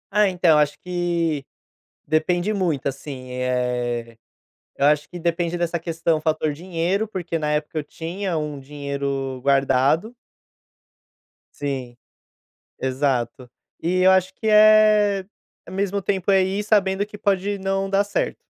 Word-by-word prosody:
É, 210 0 +4
então, 175 -4 +3
acho 145 0 +1
que 170 -5 -1 0.6
depende 175 +6 +1
muito, 175 -9 -1
assim, 135 -1 -5
eh, 125 -2 -2 0.6
eu 140 - +2
acho 150 0 +2
que 180 - -7
depende 170 0 -1
dessa 170 0 -1
questão, 165 -1 0
fator 155 -1 0
dinheiro, 180 +6 -2
porque 175 -5 -3
na 150 -1 -1
época 150 +1 -2
eu - - -1
tinha 170 +4 -4
um 150 -2 -4
dinheiro 140 -1 -4
guardado. 140 - +2 1.4
Sim, 130 -4 -4 0.8
exato. 130 -2 -1 0.3
E 180 +2 0
eu 185 - +7
acho 190 0 +2
que 220 - -3
é, 215 -2 +5 0.4
ao - - -10
mesmo 200 +1 -1
tempo 190 0 0
é 195 -1 +5
ir 190 +2 -1
sabendo 205 -2 +2
que 210 - -10
pode 200 -1 0
não 195 0 -1
dar 195 +1 +3
certo. 205 - -3
170 Hz, 135 wpm, -22 LUFS, 140-190 Hz, 1.4 s, eu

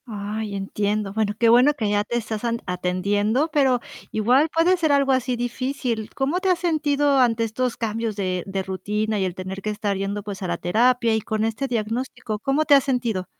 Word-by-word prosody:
Ay, 210 -1 -4
entiendo, 205 +1 -2
bueno, 210 -1 0
qué 230 - +3
bueno 250 +5 +6
que 225 -7 -2
ya 205 0 +2
te 240 +3 -2
estás 220 -1 -4
an 235 -1 -1
atendiendo, 200 - 0
pero 265 -4 +3 0.3
igual 250 +8 +3
puede 335 +3 +3
ser 325 -4 +1
algo 280 -1 +3
así 255 -1 +1
difícil. 245 -2 -3
¿Cómo 280 +6 0
te 380 0 0
has 365 - +3
sentido 290 -4 +2
ante 230 -2 +3
estos 230 +2 -2
cambios 225 -1 -2
de, 185 -3 -2
de 195 0 -2
rutina 210 +3 -2
y 190 - +1
el 180 -2 -3
tener 190 +1 -6
que 215 - -3
estar 205 -1 -2
yendo, 200 +1 -3
pues 205 -1 -7
a 185 - -3
la 170 0 -1
terapia 235 +6 +2
y 220 - 0
con 215 0 -2
este 225 +5 -2
diagnóstico? 225 -1 -3
¿Cómo 275 +7 +1
te 295 - +5
has 275 -2 +6
sentido? 235 -8 -1
225 Hz, 205 wpm, -23 LUFS, 205-260 Hz, 0.3 s, bueno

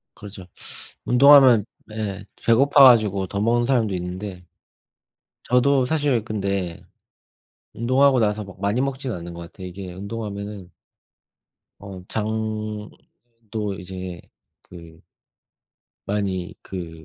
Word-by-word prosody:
그죠. 100 -3 -10 0.6
운동하면 130 -4 +7 0.2
네. 105 -3 -5 0.2
배고파 135 +4 +5
가지고 105 -7 +5
더 100 - -4
먹는 120 +2 +2
사람도 120 -5 +1
있는데 90 +1 -6 1.0
저도 130 +2 +3
사실 145 -7 +1
근데 100 -5 -3 0.9
운동하고 130 +3 +3
나서 105 -1 0
뭐 100 -1 -12
많이 100 +5 0
먹지는 135 -4 -3
않는 85 0 -8
것 85 - -8
같아요. 90 +2 -9
이게 90 0 -8
운동하면은 100 -1 -6 1.1
어 95 -2 -9
장도 110 0 -5
이제 90 -1 -7 0.4
그 85 -2 -14 1.1
많이 95 -3 -2
그 80 -4 -8
105 Hz, 220 characters per minute, -23 LUFS, 95-120 Hz, 1.1 s, 운동하면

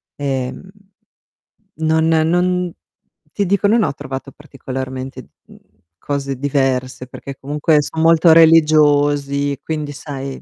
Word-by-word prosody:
Ehm, 135 +5 -4 1.1
non 160 0 +1
non 175 +2 +1 0.6
ti 200 - -1
dico, 200 +2 +1
non 225 +1 +3
ho 140 - -1
trovato 135 -1 -7
particolarmente, 130 -2 -7 0.2
mhmm, - - -17 0.4
cose 140 +2 -4
diverse 130 -2 -1
perché 135 +1 -9
comunque 150 +2 +1
son 160 +2 -4
molto 165 0 +5
religiosi, 145 -3 +3
quindi 150 -2 -4
sai 135 -2 -7
145 Hz, 110 wpm, -18 LUFS, 135-160 Hz, 1.1 s, molto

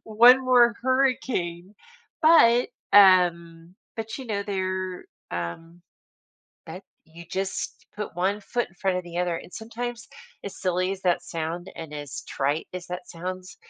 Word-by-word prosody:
One 240 +4 +6
more 245 -2 +5
hurricane. 240 -9 0 0.5
But, 250 -7 +6 0.2
um, 175 -3 +4 0.2
but, 220 -1 -5
you 265 - -8
know, 205 -3 -2
they're, 185 -2 -3 0.3
um, 165 - -6 0.8
that 175 +4 -8 0.2
you 165 +2 -13
just 190 0 -4
put 210 -5 -5
one 195 +4 0
foot 240 +4 -2
in 175 - -25
front 190 0 -1
of 180 - -6
the 175 0 -6
other. 175 -1 0
And 175 - -10
sometimes 235 +1 -6 0.4
as 200 - -8
silly 185 +1 0
as 195 - -7
that 175 -1 +1
sound 170 +1 -5
and 160 -2 -8
as 145 -1 -7
trite 145 +3 -1
as 180 -1 -6
that 180 +1 -5
sounds, 185 +2 -7
185 Hz, 150 wpm, -25 LUFS, 170-220 Hz, 0.8 s, One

